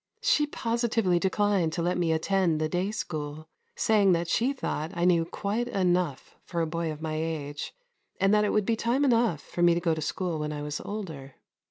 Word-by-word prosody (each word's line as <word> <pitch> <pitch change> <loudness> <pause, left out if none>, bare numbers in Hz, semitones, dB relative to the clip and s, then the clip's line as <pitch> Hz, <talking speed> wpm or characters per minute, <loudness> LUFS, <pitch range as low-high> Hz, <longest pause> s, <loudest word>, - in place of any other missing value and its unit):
She 300 -1 +3
positively 230 -8 +1
declined 190 -3 +1
to 170 - -1
let 180 +1 +1
me 170 -2 +1
attend 165 0 +1
the 155 - +1
day 180 +5 -1
school, 155 -6 -5 0.3
saying 210 -5 +4
that 170 0 0
she 240 +9 +2
thought 160 - -3
I 170 0 +1
knew 170 -2 +4
quite 210 +7 -2
enough 180 - 0
for 170 - -4
a 165 - +2
boy 165 0 -2
of 155 +1 -8
my 155 -1 -2
age, 155 -2 -3 0.5
and 195 +1 +3
that 210 0 +4
it 210 - +1
would 210 -2 +2
be 230 - +2
time 240 +5 +1
enough 230 - +2
for 175 - -5
me 175 -1 +5
to - - +1
go 170 -2 +1
to 160 - -3
school 170 +1 -2
when 150 0 -2
I 145 0 -5
was 150 0 -4
older. 160 -11 -6
175 Hz, 210 wpm, -28 LUFS, 160-210 Hz, 0.5 s, me